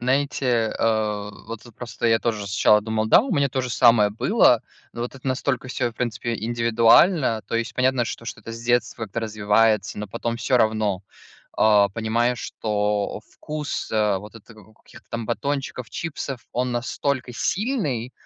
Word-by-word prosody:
Знаете, 125 Hz, -3 st, +1 dB
а, 105 Hz, -2 st, 0 dB, 0.2 s
вот 115 Hz, -1 st, -7 dB
вот 115 Hz, -, -15 dB
просто 120 Hz, -1 st, -4 dB
я 115 Hz, 0 st, +4 dB
тоже 110 Hz, -4 st, -2 dB
сначала 105 Hz, +2 st, +4 dB
думал, 110 Hz, 0 st, -1 dB
да, -, -, +7 dB
у 270 Hz, -, -4 dB
меня 140 Hz, -5 st, +2 dB
то 130 Hz, -, -1 dB
же 125 Hz, -, -4 dB
самое 115 Hz, -4 st, +5 dB
было, 125 Hz, -, +3 dB, 0.3 s
но 120 Hz, -, -4 dB
вот 120 Hz, -, -5 dB
это 135 Hz, -, -11 dB
настолько 130 Hz, -1 st, -1 dB
всё, 120 Hz, -2 st, -1 dB
в -, -, -20 dB
принципе, 120 Hz, 0 st, -3 dB
индивидуально. 115 Hz, -, +3 dB
То -, -, -5 dB
есть 115 Hz, 0 st, -2 dB
понятно, 130 Hz, -1 st, +2 dB
что 115 Hz, -, -6 dB
что-то 110 Hz, -1 st, -7 dB
с 115 Hz, -, -8 dB
детства 120 Hz, -1 st, 0 dB
это 110 Hz, +3 st, -5 dB
развивается, 105 Hz, -1 st, +1 dB
но 105 Hz, -, -4 dB
потом 115 Hz, +3 st, -3 dB
всё 125 Hz, +1 st, +2 dB
равно, 110 Hz, -4 st, +1 dB, 0.5 s
а, 105 Hz, -2 st, +4 dB
понимая, 115 Hz, +3 st, 0 dB
что 105 Hz, -2 st, -2 dB
вкус, 150 Hz, -2 st, -5 dB
а, 105 Hz, -3 st, +2 dB
вот 105 Hz, +3 st, -12 dB
это 115 Hz, +1 st, -14 dB
как 110 Hz, -2 st, -17 dB
у 110 Hz, -, -21 dB
каких-то -, -, -18 dB
там 115 Hz, -1 st, -4 dB
батончиков, 130 Hz, -1 st, -3 dB
чипсов, 140 Hz, -5 st, -5 dB
он 125 Hz, 0 st, -1 dB
настолько 130 Hz, +1 st, -2 dB
сильный, 160 Hz, -, -1 dB
115 Hz, 175 wpm, -23 LUFS, 110-125 Hz, 0.5 s, да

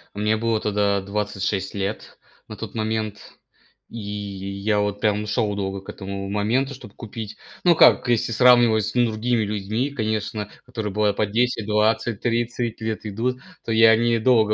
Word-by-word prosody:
Мне 105 Hz, +1 st, +1 dB
было 115 Hz, -1 st, 0 dB
тогда 100 Hz, -2 st, +1 dB
26 100 Hz, -1 st, -2 dB
лет 100 Hz, +2 st, -4 dB, 0.3 s
на 110 Hz, -, -8 dB
тот 110 Hz, -2 st, -7 dB
момент. 110 Hz, -1 st, -3 dB, 0.6 s
И 115 Hz, -, -7 dB
я 100 Hz, 0 st, -3 dB
вот 105 Hz, 0 st, -2 dB
прям 105 Hz, 0 st, +1 dB
шёл 105 Hz, 0 st, 0 dB
долго 95 Hz, -1 st, -3 dB
к -, -, -14 dB
этому 100 Hz, 0 st, -6 dB
моменту, 120 Hz, +7 st, 0 dB
чтобы 105 Hz, -5 st, -13 dB
купить. 110 Hz, -1 st, -8 dB, 0.3 s
Ну, 175 Hz, -2 st, +5 dB
как, 135 Hz, -, +6 dB
если 120 Hz, -1 st, +1 dB
сравнивать 120 Hz, -2 st, +5 dB
с -, -, -3 dB
другими 120 Hz, -1 st, +1 dB
людьми, 105 Hz, +6 st, -2 dB
конечно, 110 Hz, -4 st, -2 dB, 0.2 s
которые 110 Hz, -5 st, -5 dB
бывает 105 Hz, -1 st, +1 dB
по 105 Hz, -, +1 dB
10, 115 Hz, +1 st, 0 dB
20, 105 Hz, +1 st, +1 dB
30 120 Hz, -1 st, -1 dB
лет 110 Hz, 0 st, -3 dB
идут, 120 Hz, +5 st, -2 dB, 0.3 s
то 115 Hz, -, -2 dB
я 110 Hz, 0 st, +7 dB
недолго 115 Hz, -1 st, +3 dB
110 Hz, 155 wpm, -23 LUFS, 105-115 Hz, 0.6 s, я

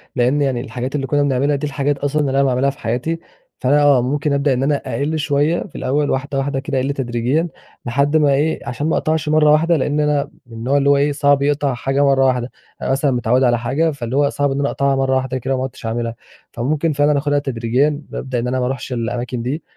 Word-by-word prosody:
لأن 130 Hz, +4 st, +2 dB
يعني 130 Hz, -4 st, 0 dB
الحاجات 130 Hz, +1 st, -5 dB
اللي 135 Hz, -2 st, -2 dB
كنا 145 Hz, 0 st, +2 dB
بنعملها 140 Hz, +1 st, +1 dB
دي 145 Hz, +2 st, -2 dB
الحاجات 145 Hz, 0 st, -1 dB
أصلًا 145 Hz, +2 st, 0 dB
اللي 140 Hz, -2 st, 0 dB
أنا 135 Hz, +1 st, +3 dB
باعملها 130 Hz, 0 st, +2 dB
في 140 Hz, -, -8 dB
حياتي، 125 Hz, +9 st, -2 dB, 0.4 s
فأنا 145 Hz, +3 st, +3 dB
آه 140 Hz, -3 st, +5 dB
ممكن 145 Hz, +4 st, -1 dB
أبدأ 140 Hz, 0 st, +2 dB
إن 130 Hz, +1 st, -1 dB
أنا 145 Hz, +1 st, +2 dB
أقِل 155 Hz, +3 st, -2 dB
شوية 150 Hz, +2 st, +1 dB
في 180 Hz, -, -15 dB
الأول 145 Hz, +3 st, 0 dB
واحدة 135 Hz, +1 st, -2 dB
واحدة 135 Hz, 0 st, -1 dB
كده 135 Hz, 0 st, -3 dB
أقِل 135 Hz, +2 st, -1 dB
تدريجيًا، 130 Hz, +5 st, -1 dB, 0.4 s
لحد 140 Hz, +5 st, +2 dB
ما 145 Hz, -2 st, +3 dB
إيه 150 Hz, +3 st, +1 dB
عشان 135 Hz, +6 st, -2 dB
ما -, -, +1 dB
اقطعش 155 Hz, -1 st, -1 dB
مرة 155 Hz, -1 st, +4 dB
واحدة، 165 Hz, +2 st, +3 dB
لأن 145 Hz, +2 st, 0 dB
أنا 150 Hz, -1 st, +1 dB, 0.2 s
من 115 Hz, -2 st, -12 dB
النوع 130 Hz, +5 st, 0 dB
اللي 140 Hz, 0 st, +2 dB
هو 140 Hz, -, +5 dB
إيه 145 Hz, +1 st, +2 dB
صعب 145 Hz, -1 st, +2 dB
يقطع 145 Hz, -1 st, +1 dB
حاجة 135 Hz, +3 st, 0 dB
مرة 135 Hz, -1 st, +3 dB
واحدة، 125 Hz, -1 st, 0 dB, 0.3 s
أنا -, -, -1 dB
مثلًا 135 Hz, +1 st, +1 dB
متعود 125 Hz, +1 st, +1 dB
على 120 Hz, -2 st, +3 dB
حاجة، 145 Hz, +7 st, 0 dB
فاللي 130 Hz, -4 st, -5 dB
هو 145 Hz, 0 st, +3 dB
صعب 145 Hz, -1 st, 0 dB
إن 135 Hz, -, -2 dB
أنا 140 Hz, -, +1 dB
أقطعها 140 Hz, 0 st, +1 dB
مرة 135 Hz, 0 st, +1 dB
واحدة 130 Hz, 0 st, -1 dB
كده 135 Hz, +2 st, -2 dB
وما 130 Hz, -, -2 dB
عُدتش 130 Hz, -3 st, -7 dB
أعملها. 115 Hz, 0 st, -2 dB, 0.4 s
فممكن 150 Hz, +6 st, -1 dB
فعلًا 145 Hz, +1 st, +2 dB
أخدها 145 Hz, 0 st, +1 dB
تدريجيًا، 135 Hz, +3 st, 0 dB
بابدأ 130 Hz, -2 st, -3 dB
إن 120 Hz, -, -2 dB
أنا 130 Hz, +1 st, -1 dB
ما 125 Hz, -, 0 dB
أرُحش 130 Hz, 0 st, -4 dB
الأماكن 120 Hz, +1 st, -3 dB
دي، 140 Hz, +7 st, -3 dB
140 Hz, 235 wpm, -19 LUFS, 130-145 Hz, 0.4 s, آه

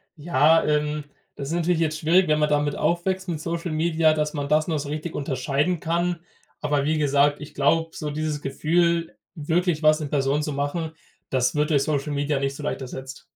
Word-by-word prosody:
Ja, 160 Hz, 0 st, +3 dB
ähm, 150 Hz, 0 st, 0 dB, 0.3 s
das 140 Hz, -1 st, -6 dB
ist 165 Hz, -, -2 dB
natürlich 170 Hz, 0 st, +1 dB
jetzt 155 Hz, -1 st, 0 dB
schwierig, 175 Hz, +3 st, +4 dB
wenn 155 Hz, 0 st, +2 dB
man 150 Hz, -, +2 dB
damit 145 Hz, -1 st, +1 dB
aufwächst, 185 Hz, +2 st, 0 dB
mit 165 Hz, -3 st, -3 dB
Social 170 Hz, 0 st, -3 dB
Media, 160 Hz, 0 st, +2 dB
dass 150 Hz, -1 st, -1 dB
man 145 Hz, -2 st, -3 dB
das 155 Hz, +2 st, +2 dB
noch 155 Hz, -3 st, 0 dB
so 145 Hz, 0 st, -5 dB
richtig 155 Hz, +2 st, -4 dB
unterscheiden 145 Hz, +4 st, -1 dB
kann. 170 Hz, +2 st, -1 dB, 0.4 s
Aber 145 Hz, -1 st, 0 dB
wie 155 Hz, +1 st, +1 dB
gesagt, 145 Hz, 0 st, +2 dB
ich 150 Hz, -, -9 dB
glaube, 165 Hz, +4 st, +2 dB
so 150 Hz, -2 st, -4 dB
dieses 155 Hz, 0 st, -3 dB
Gefühl, 170 Hz, +4 st, 0 dB, 0.2 s
wirklich 165 Hz, +1 st, 0 dB
was 155 Hz, +1 st, +5 dB
in 145 Hz, -, -4 dB
Person 140 Hz, +1 st, +1 dB
zu 150 Hz, -1 st, -3 dB
machen, 145 Hz, +3 st, -2 dB, 0.4 s
das 130 Hz, 0 st, +1 dB
wird 150 Hz, 0 st, +1 dB
durch 140 Hz, -2 st, +3 dB
Social 145 Hz, 0 st, -1 dB
Media 145 Hz, 0 st, 0 dB
nicht 140 Hz, 0 st, -2 dB
so -, -, -8 dB
leicht -, -, -3 dB
ersetzt. 130 Hz, +1 st, -8 dB
150 Hz, 200 wpm, -24 LUFS, 145-165 Hz, 0.4 s, was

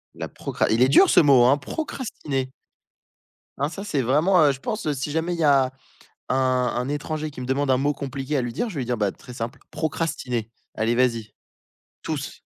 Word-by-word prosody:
La -, -, -5 dB
procra -, -, -2 dB
il 115 Hz, +3 st, +4 dB
est 130 Hz, -, +4 dB
dur 175 Hz, +7 st, +6 dB
ce -, -, +6 dB
mot, 135 Hz, -5 st, +6 dB
hein! 140 Hz, +3 st, +5 dB
Procrastiner. 145 Hz, -, -4 dB, 1.1 s
Ah 145 Hz, +2 st, 0 dB
ça 195 Hz, +3 st, -7 dB
c'est 150 Hz, -10 st, -1 dB
vraiment, 155 Hz, +9 st, +3 dB
heu -, -, +5 dB
je 135 Hz, -, -6 dB
pense, 215 Hz, +2 st, -4 dB
heu, 150 Hz, -, +1 dB
si 135 Hz, +3 st, -3 dB
jamais 165 Hz, +3 st, -1 dB
il -, -, -7 dB
y -, -, +1 dB
a 135 Hz, -3 st, +4 dB, 0.6 s
un 130 Hz, -, +2 dB, 0.4 s
un 125 Hz, +2 st, -1 dB
étranger 155 Hz, +1 st, -3 dB
qui 130 Hz, -, -10 dB
me -, -, -5 dB
demande 135 Hz, +1 st, 0 dB
un 130 Hz, -, +5 dB
mot 145 Hz, +3 st, +1 dB
compliqué 140 Hz, +1 st, -5 dB
à -, -, +2 dB
lui 120 Hz, -1 st, -3 dB
dire, 240 Hz, -, -1 dB
je -, -, -9 dB
vais -, -, -1 dB
lui 120 Hz, -, -3 dB
dire: 125 Hz, -1 st, -1 dB
«Bah 105 Hz, -2 st, 0 dB
très 125 Hz, -, -13 dB
simple 115 Hz, 0 st, -5 dB
"procrastiner" 145 Hz, -7 st, -2 dB, 0.2 s
allez, 115 Hz, +2 st, +1 dB
vas-y» 115 Hz, -4 st, 0 dB, 0.7 s
tous. -, -, -5 dB
135 Hz, 215 wpm, -24 LUFS, 125-155 Hz, 1.1 s, dur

